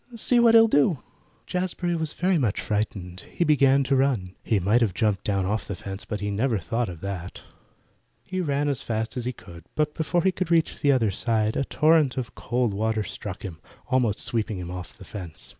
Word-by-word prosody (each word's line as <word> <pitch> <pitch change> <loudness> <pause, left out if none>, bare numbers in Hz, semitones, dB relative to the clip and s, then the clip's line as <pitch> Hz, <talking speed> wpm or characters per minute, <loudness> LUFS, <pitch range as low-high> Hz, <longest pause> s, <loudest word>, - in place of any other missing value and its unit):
"See 240 +2 +2
what 230 -1 +6
he'll 225 0 +8
do." 145 - +2 0.4
Jazbury 180 -1 -2
was 160 -2 -2
very 180 -1 +1
much 115 -8 0
frightened. 100 -4 -3
He - - 0
began 140 -3 +4
to 135 +1 +1
run. 125 -9 +1
He 110 - +1
might 105 +6 +3
have 105 -6 +1
jumped 105 -4 +1
down 100 -2 0
off 105 +3 -2
the 100 - -4
fence, 95 +2 -7
but 105 -2 -4
he 105 0 -2
never 115 +3 +1
thought 115 +5 -2
of 85 -3 -9
that. 95 -2 -6 0.8
He 185 0 -3
ran 145 -3 0
as 140 -4 0
fast 110 +2 -3
as 125 -2 -3
he 125 - 0
could, 85 -8 -13
but 150 -1 +1
before 160 +2 0
he 190 - +4
could 185 -1 -3
reach 165 -1 +2
the 145 - +4
other 115 -6 +2
side 110 +1 0
a 135 - 0
torrent 155 -3 +3
of 125 -3 -3
cold 120 -3 -1
water 110 +1 0
struck 100 -2 -7
him, 85 -6 -7 0.3
almost 120 -5 +2
sweeping 115 -3 -1
him 90 -1 -6
off 90 +4 -8
the 100 - -12
fence. 90 -7 -7
115 Hz, 210 wpm, -25 LUFS, 100-145 Hz, 0.8 s, he'll